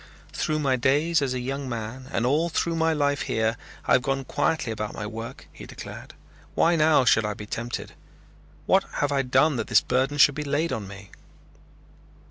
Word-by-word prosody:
"Through 155 - -1
my 135 -4 +1
days 145 +5 +2
as 130 -2 -1
a - - -2
young 135 +2 -4
man 120 +3 -6
and 120 - 0
all 155 +6 +2
through 165 0 -1
my 165 0 +2
life 145 -2 +1
here 110 -2 0 0.3
I - - +3
have 130 - +5
gone 135 +1 -2
quietly 145 -2 0
about 105 -1 -4
my 105 - -5
work," 115 +2 -7
he - - -11
declared. - - -10 0.4
"Why 170 +1 +3
now 155 -4 +4
should 115 - +4
I 105 -1 -2
be 105 - -8
tempted? 120 +3 -5 0.7
What - - +4
have 145 0 0
I 140 -1 +2
done 130 +3 +2
that - - -3
this - - +5
burden 130 +3 0
should 145 0 +6
be 150 +2 -4
laid 150 +3 -1
on 105 -3 -4
me?" 95 0 -11
135 Hz, 195 wpm, -25 LUFS, 115-150 Hz, 0.7 s, should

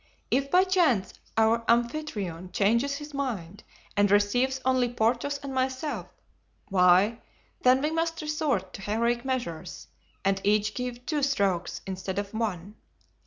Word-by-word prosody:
If 275 +1 +1
by 365 +4 +5
chance 340 - +2 0.2
our 225 +1 +3
Amphitryon 230 - -1
changes 235 +7 +2
his 295 0 -8
mind 210 -9 -4 0.3
and 205 0 +3
receives 245 +7 +2
only 255 -2 +2
Porthos 245 +5 0
and 275 -1 -5
myself, 260 +3 -2 0.6
why, 190 +4 +4 0.4
then, 255 +2 +4
we 305 - +1
must 330 0 -1
resort 295 - -1
to - - -8
heroic 235 +4 0
measures 245 -12 -4 0.4
and 195 0 +1
each 210 +1 +2
give 250 -1 -5
two 305 -2 -1
strokes 200 -11 0
instead 190 0 -4
of 205 0 -3
one. 210 -3 -3
235 Hz, 135 wpm, -27 LUFS, 200-275 Hz, 0.6 s, by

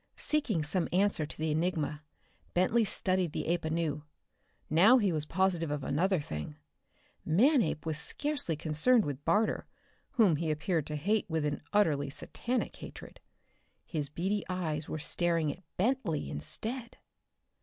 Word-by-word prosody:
Seeking 240 - +1
some 170 +4 0
answer 185 -4 +2
to 160 - -8
the 155 0 -1
enigma, 155 -2 -1 0.5
Bentley 200 +6 +3
studied 185 -5 0
the - - -2
ape 170 +1 0
anew. 160 -2 -1 0.6
Now 195 +11 +6
he 205 -6 +2
was 155 -2 -1
positive 175 -2 +1
of 145 -1 -3
another 180 +7 +1
thing: 75 - -6 0.7
Manape 210 - +3
was 155 -2 -2
scarcely 290 - 0
concerned 160 +10 +3
with 145 -1 -4
Barter, 215 +2 +1 0.5
whom 205 - +4
he 165 +1 -2
appeared 155 0 0
to 150 - -3
hate 200 +7 0
with 160 -2 0
an 145 -1 -2
utterly 150 -9 +2
satanic 240 - -3
hatred. - - -10 0.7
His 150 -4 -3
beady 190 +7 -1
eyes 160 -5 -2
were - - -3
staring 165 0 0
at 180 - -18 0.2
Bentley 195 - 0
instead! 225 - -4
165 Hz, 145 wpm, -31 LUFS, 150-205 Hz, 0.7 s, Now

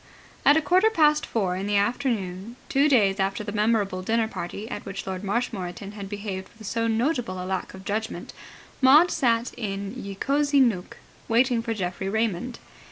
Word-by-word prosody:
At 290 - +6
a 320 - +1
quarter 370 +7 +4
past 300 -7 +3
four 190 -5 0
in 190 +2 -3
the 205 0 +2
afternoon, 205 -2 -1
two 280 +3 +3
days 200 -7 +3
after 195 +3 0
the 205 - -5
memorable 210 -3 +1
dinner 225 +3 +1
party 200 +1 -6
at 215 -4 -6
which 195 0 -6
Lord 190 0 -4
Marshmoreton 200 -3 -3
had 200 -2 -8
behaved 200 -2 -5
with 220 -2 -9
so 230 +2 0
notable 230 - 0
a 180 - -4
lack 190 0 -3
of 190 +1 -12
judgment, 220 +2 -3 0.5
Maud 295 +7 +7
sat 235 -4 +1
in 200 -3 -4
Ye 200 -6 -6
Cosy 285 +5 +2
Nooke, 225 -9 +1 0.3
waiting 240 +1 +3
for 230 -1 -3
Geoffrey 185 -1 -3
Raymond. 220 +2 -1
215 Hz, 175 wpm, -25 LUFS, 195-245 Hz, 0.5 s, Maud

